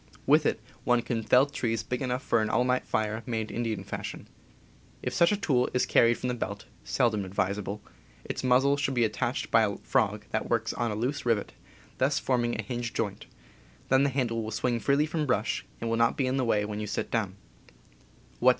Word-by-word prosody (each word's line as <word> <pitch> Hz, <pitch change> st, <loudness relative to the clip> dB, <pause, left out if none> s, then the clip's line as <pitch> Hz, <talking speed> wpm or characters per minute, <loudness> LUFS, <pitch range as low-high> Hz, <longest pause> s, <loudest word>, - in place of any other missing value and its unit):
With -, -, +5 dB
it -, -, 0 dB, 0.2 s
one 120 Hz, -1 st, +2 dB
can 115 Hz, -1 st, -2 dB
fell 125 Hz, +4 st, +5 dB
trees 115 Hz, -6 st, -2 dB
big 125 Hz, +2 st, -3 dB
enough 130 Hz, 0 st, -1 dB
for 115 Hz, -, +2 dB
an 110 Hz, -, 0 dB
all 125 Hz, -, +2 dB
night 125 Hz, 0 st, 0 dB
fire 110 Hz, +1 st, -1 dB
made 110 Hz, -2 st, -2 dB
Indian 115 Hz, -3 st, -2 dB
fashion. -, -, -6 dB, 0.8 s
If -, -, -2 dB
such 170 Hz, -, +4 dB
a 205 Hz, -, +1 dB
tool 130 Hz, -10 st, +1 dB
is 125 Hz, -, +3 dB
carried 115 Hz, 0 st, +4 dB
from 125 Hz, -, -3 dB
the -, -, 0 dB
belt 100 Hz, -3 st, -4 dB, 0.2 s
(seldom 115 Hz, -6 st, +1 dB
advisable) 100 Hz, +2 st, -2 dB, 0.4 s
its -, -, -4 dB
muzzle 130 Hz, +3 st, +4 dB
should 135 Hz, -1 st, -1 dB
be 120 Hz, -1 st, +4 dB
attached 110 Hz, -, -2 dB
by -, -, +6 dB
a -, -, 0 dB
frog -, -, 0 dB
that -, -, -2 dB
works -, -, 0 dB
on 120 Hz, -1 st, -1 dB
a 105 Hz, -, -2 dB
loose 125 Hz, +7 st, -2 dB
rivet, 115 Hz, -4 st, 0 dB, 0.5 s
thus 135 Hz, +2 st, +2 dB
forming 120 Hz, -2 st, 0 dB
a -, -, -1 dB
hinged 120 Hz, +1 st, -4 dB
joint, 105 Hz, -4 st, -3 dB, 0.6 s
then 130 Hz, +1 st, +5 dB
the 140 Hz, -, +3 dB
handle 125 Hz, -4 st, -1 dB
will 110 Hz, -, -4 dB
swing 120 Hz, +2 st, 0 dB
free 140 Hz, +4 st, +2 dB
from 155 Hz, -1 st, -2 dB
brush 125 Hz, -, 0 dB
and 115 Hz, -, -3 dB
will 115 Hz, 0 st, 0 dB
not 115 Hz, 0 st, +2 dB
be 135 Hz, -, +1 dB
in 130 Hz, +1 st, 0 dB
the 130 Hz, -, +1 dB
way 105 Hz, -3 st, +2 dB
when 105 Hz, 0 st, -4 dB
you 105 Hz, -, -3 dB
sit -, -, -3 dB
down. 105 Hz, -5 st, -1 dB
120 Hz, 210 wpm, -28 LUFS, 110-130 Hz, 0.8 s, by